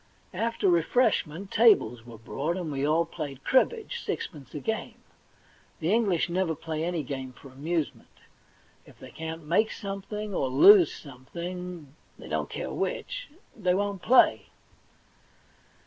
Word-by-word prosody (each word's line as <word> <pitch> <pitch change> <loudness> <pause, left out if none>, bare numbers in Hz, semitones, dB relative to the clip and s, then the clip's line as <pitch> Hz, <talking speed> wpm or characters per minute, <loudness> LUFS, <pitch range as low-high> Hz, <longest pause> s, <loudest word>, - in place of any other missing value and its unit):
After 230 -3 -1
refreshment, 175 -1 +1
tables 125 - +4
were 115 -2 -10
brought, 145 - -3
and 170 -4 -4
we 135 -1 -2
all 160 +3 +2
played 145 -5 -7
cribbage, 465 - +1
sixpence 140 -7 -5
a - - -3
game. 220 +8 -3 0.8
The 170 +5 +1
English 200 -8 +2
never 175 -2 0
play 160 0 -4
any 170 -2 -1
game 130 -1 -6
for 135 - -14
amusement. 150 +4 -3 0.8
If - - -17
they - - -12
can't 160 0 -6
make 195 +8 +2
something 205 +1 -5
or 135 - 0
lose 175 +6 +8
something 170 +3 -8
— - - -35
they - - -11
don't - - -2
care - - -5
which - - -3
— - - -34
they 185 -5 +1
won't 200 -1 -2
play. 255 +6 +4
170 Hz, 145 wpm, -27 LUFS, 145-200 Hz, 0.8 s, lose